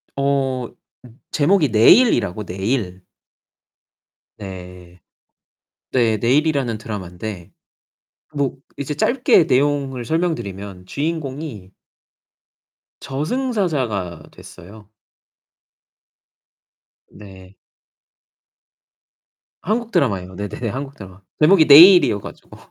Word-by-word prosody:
어. 135 -3 -1 0.4
음. 120 +2 -18
제목이 155 0 +2
내일이라고, 115 - +4
내일. 95 -1 -3 1.4
네. 90 -2 -11 0.9
네. 115 -4 +2
내일이라는 135 -1 0
드라마인데 95 -3 -8 0.8
뭐 140 -3 -2 0.2
이제 140 +1 -4
짧게 240 - +3
내용을 135 -2 0
설명드리면 100 - -4
주인공이 140 - -5 1.3
저승사자가 145 - -3
됐어요. 105 +3 -15 2.2
네. 95 -2 -15 2.1
한국 225 +5 -2
드라마예요. 95 - -1
네네네, 105 +4 -5
한국 135 +4 -6
드라마. 95 -1 -13 0.2
제목이 160 +1 +5
내일이어 160 - +8
가지고. - - -13
125 Hz, 200 characters per minute, -19 LUFS, 100-150 Hz, 2.2 s, 내일이어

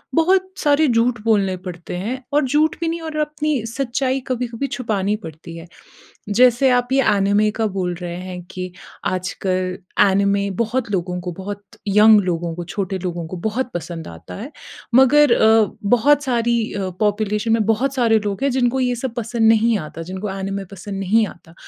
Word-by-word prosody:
बहुत 375 +3 +3
सारे 295 0 +3
झूठ 235 -1 +2
बोलने 200 -4 +2
पड़ते 175 -1 -7
हैं 215 +8 -3 0.2
और 295 -1 +3
झूठ 300 +4 +2
भी 335 - -1
नहीं 335 +1 -2
और 320 -1 -6
अपनी 300 0 -1
सच्चाई 260 +2 -1
कभी-कभी 250 +1 -2
छुपानी 210 -6 -1
पड़ती 165 -4 -10
है। 165 +1 -10 0.7
जैसे 255 +1 +5
आप 245 0 -2
ये 270 0 +4
एनीमे 205 +2 +2
का 225 - +2
बोल 180 -2 -1
रहे 175 -1 -5
हैं 180 -1 -7
कि 185 0 -5 0.4
आजकल 185 0 -2 0.3
एनीमे 200 +1 +1
बहुत 235 0 -1
लोगों 180 -1 -1
को, 180 0 -5
बहुत 200 +3 -7 0.3
यंग 210 +1 +7
लोगों 170 -2 -2
को, 175 +1 -6
छोटे 190 +2 -3
लोगों 175 -2 -4
को 185 - -7
बहुत 250 +4 -2
पसंद 170 -1 -5
आता 85 -1 -10
है। 265 - -7 0.4
मगर 265 +2 +6
अ, 220 -2 +4 0.3
बहुत 290 +5 +3
सारी 235 -3 0
अ, 195 -2 -3
पॉपुलेशन 210 +1 0
में 225 -1 +3
बहुत 245 +5 +1
सारे 230 -4 +3
लोग 200 +1 -3
हैं 280 - +2
जिनको 250 +1 +1
ये 250 -1 +1
सब 250 -3 -3
पसंद 235 -1 +1
नहीं 225 +1 +4
आता, 165 - -8
जिनको 190 +4 -5
एनीमे 195 +1 -3
पसंद 195 +1 -7
नहीं 215 +3 +3
आता 170 -3 -13
215 Hz, 175 wpm, -20 LUFS, 185-250 Hz, 0.7 s, यंग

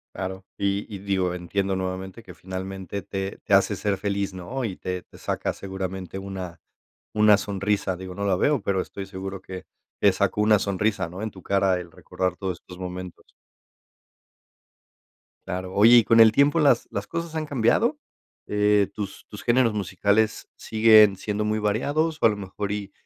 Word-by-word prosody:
Claro 95 0 -5
y 100 0 0
y, 100 - -5
digo, 95 -2 0
entiendo 95 +2 -2
nuevamente 95 +3 -5
que 90 - -11
finalmente 95 +2 -6
te 95 0 -5
te - - -1
hace - - +4
ser 100 -2 -1
feliz, 100 -1 -2
¿no?, 105 +9 -5
y 100 -5 -3
te 90 -1 -4
te - - -18
saca - - -2
seguramente 95 -1 -6
una 95 -3 -6 0.5
una 105 -1 +6
sonrisa. 100 -2 -1
Digo, 95 0 -8
no 100 +1 -3
la 95 -2 +2
veo, 145 -1 +2
pero 95 -1 0
estoy 100 -1 -7
seguro 95 0 -6
que, 95 -1 -8 0.4
te - - +6
sacó 105 - 0
una 105 -1 +5
sonrisa, 100 -1 -1
¿no?, 90 +4 -8
en 110 - -3
tu 95 - -13
cara 95 -2 +2
el 85 -1 -10
recordar 90 -1 -3
todos 95 -4 -4
estos 90 - -12
momentos. 90 -1 -8 2.1
Claro, 95 0 -4
oye, 115 +4 +7
y 120 - +7
con 115 +3 +4
el 110 -1 +8
tiempo, 145 +6 +4
¿las 140 -6 +3
las 100 +1 -4
cosas 170 -1 -4
han 155 - -1
cambiado? 145 - +2 0.5
Eh, 105 -1 +3
¿tus 100 -2 -6
tus 105 - -9
géneros 120 -2 +3
musicales, 105 +2 0
siguen 110 -2 +6
siendo 105 +2 -3
muy 105 0 0
variados? 145 +10 0
O - - +4
a 115 - +8
lo 105 - -1
mejor 100 +1 -4
y 100 -1 -5
100 Hz, 175 wpm, -25 LUFS, 95-105 Hz, 2.1 s, el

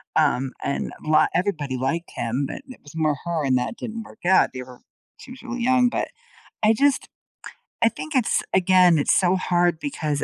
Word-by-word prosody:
um, 135 -4 +1
and 140 - -2
a - - -9
lot 155 - +4
everybody 155 -8 -1
liked 165 +7 -2
him, 120 +4 -1
but - - -7
it 255 - -12
was 145 +2 -14
more 155 -3 +1
her 170 -3 -1
and 130 -1 +3
that 125 - -3
didn't 225 0 -6
work 215 - -16
out, 190 +1 +4
they 130 - -6
were 125 -1 -14 0.4
she 255 - -12
was 255 - -11
really 245 -1 -4
young, 250 0 +4
but, - - -2 0.5
I 215 +1 +5
just 280 +4 +1 0.8
I 230 - +6
think 310 +5 -7
it's 255 -4 +2
again, 185 -2 +5
it's 145 - +2
so 185 0 +3
hard 175 -2 +1
because 155 - -2
175 Hz, 200 wpm, -23 LUFS, 145-225 Hz, 0.8 s, I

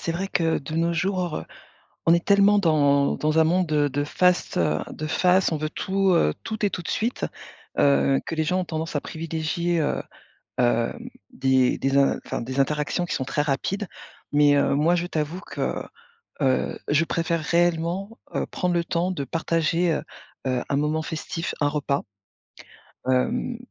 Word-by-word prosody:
c'est - - -2
vrai 175 +4 -2
que, 165 -4 +1
de 145 +3 -7
nos 165 +1 +1
jours, 180 -1 -1 0.6
on 165 - +6
est 170 - +1
tellement 200 +1 +5
dans 145 -6 +3
dans 155 +1 +1
un 160 - +6
monde 180 +3 +2
de 150 -1 +2
de 145 +1 -1
face, 180 +4 +1
heu, 75 -3 +1
de 155 - -5
face, 180 +3 +3
on - - +1
veut, 155 - -2
heu, - - -19
tout 190 +2 +1 0.3
tout 220 -1 -1
et - - 0
tout 180 - -4
de - - -7
suite, 235 +3 -1 0.5
heu, 140 -1 +4
que - - -3
les 160 - 0
gens 180 +4 +1
ont - - -2
tendance 160 -2 -3
à - - 0
privilégier, 165 +2 -2
heu, 145 - 0 0.6
hem, 120 - +1 0.2
des 130 - +2
des 135 +1 +2
in 140 - +3
enfin, - - -3
des 130 +3 -5
interactions 150 +5 0
qui - - -3
sont 130 - -1
très 145 +2 0
rapides. 155 +8 -1 0.5
Mais 145 0 +5
heu, 140 -1 +2
moi 155 +5 +3
je 175 0 -1
t'avoue 160 +1 -3
que, - - -3 0.6
heu, 130 -1 +1
je 150 +3 +3
préfère 165 0 0
réellement, 175 +5 0 0.2
heu, - - 0
prendre 180 -1 -1
le 170 -1 +1
temps 170 +2 0
de 145 -6 -3
partager, 165 +2 0
heu, - - -1 0.5
heu, 125 -1 0
un 140 - 0
moment 150 +2 +1
festif, 165 +1 -4
un 145 - +4
repas, 145 -1 -1 1.1
hem, 230 - +1
160 Hz, 180 wpm, -24 LUFS, 145-180 Hz, 1.1 s, on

